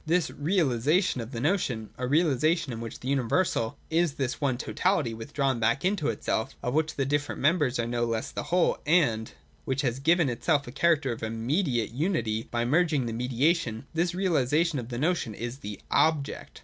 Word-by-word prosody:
193.] 165 +3 +3 0.2
This 145 - -11
'realisation' 155 - +2
of 115 +2 -7
the 115 - -4
notion, 125 - -1
— - - -31
a 125 - -1
realisation 155 0 +2
in 115 - -6
which 115 -1 -7
the 130 - -6
universal 135 -1 0
is 165 -2 +2
this 130 +2 -3
one 135 -4 +1
totality 180 -4 0
withdrawn 135 +2 -1
back 115 +7 +1
into 185 -6 +1
itself 130 -3 -2
(of 125 - -1
which 160 +1 0
the 135 - 0
different 145 +1 -1
members 145 -4 +2
are 115 - 0
no 120 0 -1
less 115 -1 -2
the - - -4
whole, 175 0 +2
and) 120 -10 +2 0.3
which 135 +1 -1
has 125 -1 -1
given 165 +2 +3
itself 140 +4 +1
a 120 - -8
character 150 -2 +2
of 115 - -5
'immediate' 120 - -1
unity 120 - -1
by 120 0 -1
merging 155 -1 +2
the 115 - -3
mediation: 125 +1 0
— - - -32
this 170 +2 0
realisation 165 -3 +1
of 120 -1 -7
the 120 - -4
notion 150 - 0
is 120 +4 -5
the 105 -3 -7
Object. 155 -3 0
135 Hz, 195 wpm, -27 LUFS, 120-165 Hz, 0.3 s, 193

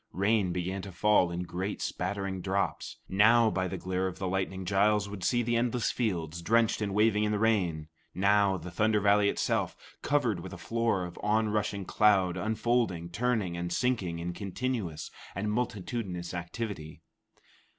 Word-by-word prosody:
Rain 100 0 +2
began 90 +2 -2
to 100 - -8
fall 100 0 +3
in 85 +1 -3
great 95 +3 -4
spattering 95 0 -3
drops. 100 +1 -2
Now, 110 +3 +5
by 95 -1 -1
the 95 +1 -4
glare 95 +1 -1
of 95 - -6
the 95 - -3
lightning, 95 0 -2
Giles 100 +2 +2
would 100 -2 -7
see 120 -1 +2
the 120 +1 0
endless 120 0 +1
fields, 85 -8 -2
drenched 115 +4 +2
and 100 -2 -2
waving 105 0 +3
in 105 - +1
the 105 - +1
rain; 95 -8 +1 0.3
now 100 +1 +3
the 90 +1 -8
Thunder 105 +4 +2
Valley 100 0 +4
itself, - - -1 0.2
covered 125 -10 +1
with 95 +2 -8
a - - -7
floor 115 0 0
of 90 0 -9
onrushing 105 -2 0
cloud 95 -4 +3
unfolding, 110 -3 0
turning, 110 -3 0
and 85 0 -3
sinking 100 -6 0
in 85 +1 -4
continuous 100 -5 -3 0.2
and 105 +3 -1
multitudinous 100 -5 -3
activity. 90 -2 -5
100 Hz, 160 wpm, -29 LUFS, 90-110 Hz, 0.3 s, Now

